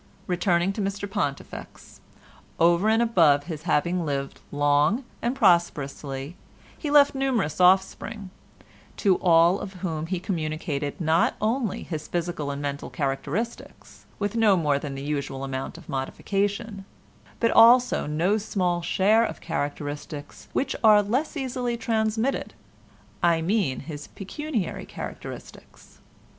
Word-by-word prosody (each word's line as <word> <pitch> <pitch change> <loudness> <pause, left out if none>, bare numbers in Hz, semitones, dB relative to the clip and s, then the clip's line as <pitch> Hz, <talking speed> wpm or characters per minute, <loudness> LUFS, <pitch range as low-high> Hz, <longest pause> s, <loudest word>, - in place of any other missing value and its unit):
Returning 180 +1 +1
to 210 - -3
Mr 200 +1 -3
Pontifex, 195 -9 -5 0.6
over 170 +5 +4
and 225 +1 +4
above 165 -11 +4
his 155 -2 -6
having 175 +4 +1
lived 140 -3 -3
long 145 - +2 0.2
and 240 +3 -1
prosperously, 150 - +1 0.4
he 300 - -5
left 285 -1 +6
numerous 250 - 0
offspring, 190 +2 +2 0.7
to 190 -3 +3
all 170 +1 +4
of 195 - -7
whom 160 -2 -3
he 185 0 -2
communicated 155 -5 -3
not 165 0 +2
only 220 0 -1
his 155 -3 -5
physical 170 -4 -3
and 140 0 -4
mental 140 0 -4
characteristics, 150 - -4
with 205 +1 -2
no 215 -4 +4
more 145 -4 +1
than 140 -1 -6
the 135 - -6
usual 140 -2 -3
amount 135 +3 -4
of 170 - -14
modification, 200 - -2 0.6
but 230 - +2
also 240 -2 +6
no 170 +8 +1
small 180 -4 -1
share 205 +6 +3
of - - -3
characteristics 145 0 -5
which 275 - -1
are 210 -2 +7
less 260 +10 -1
easily 250 -3 -2
transmitted—I 165 - -2
mean 190 -7 0
his 145 -1 -8
pecuniary 230 - -4
characteristics. - - -10
175 Hz, 125 wpm, -25 LUFS, 145-215 Hz, 0.7 s, are